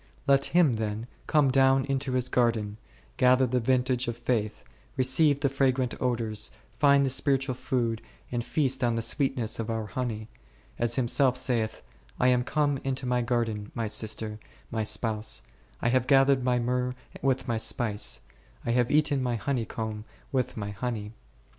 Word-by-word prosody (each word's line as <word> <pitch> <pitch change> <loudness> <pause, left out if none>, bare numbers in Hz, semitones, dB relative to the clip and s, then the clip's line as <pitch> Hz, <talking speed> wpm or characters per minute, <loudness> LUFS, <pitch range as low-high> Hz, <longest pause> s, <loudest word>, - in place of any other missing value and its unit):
Let 140 0 +4
Him 145 -5 +3
then 110 +1 -3 0.2
come 150 -4 +3
down 135 0 +4
into 135 -1 -2
His 125 -1 +1
garden, 115 -5 +1 0.4
gather 130 +1 +5
the 125 0 0
vintage 125 +1 +1
of 120 -1 -3
faith, 115 -3 -1 0.3
receive 135 +3 +3
the 140 - +3
fragrant 130 -2 +1
odours, 115 -4 0 0.3
find 140 -1 +5
the - - +1
spiritual 135 0 +1
food, 120 -3 -1 0.3
and 120 -1 -1
feast 135 -1 0
on 120 -1 +2
the 115 - 0
sweetness 130 -5 0
of 115 0 -3
our 115 -1 -2
honey; 110 0 -4 0.5
as 120 0 +2
Him 125 -2 +1
self 130 0 +3
saith, 120 -4 -1 0.2
/ - - -27
am 125 0 +3
come 145 0 0
into 135 -1 -2
My 125 0 +1
garden, 115 -4 -1
My 115 -2 -1
sister, 110 0 -2 0.3
My 115 - -1
spouse: 110 0 -1 0.4
I 120 - +3
have 130 0 +2
gathered 135 -1 +4
My 125 -1 +2
myrrh 125 +1 -1 0.3
with 135 -1 0
My 115 -2 0
spice; 110 -1 -1 0.4
I 120 - 0
have 120 0 +2
eaten 150 -2 +2
My 125 -2 0
honey 120 0 -1
comb 110 -1 -5 0.3
with 130 -3 -1
My 105 -1 -4
honey*. 105 0 -4
125 Hz, 165 wpm, -28 LUFS, 115-135 Hz, 0.5 s, gather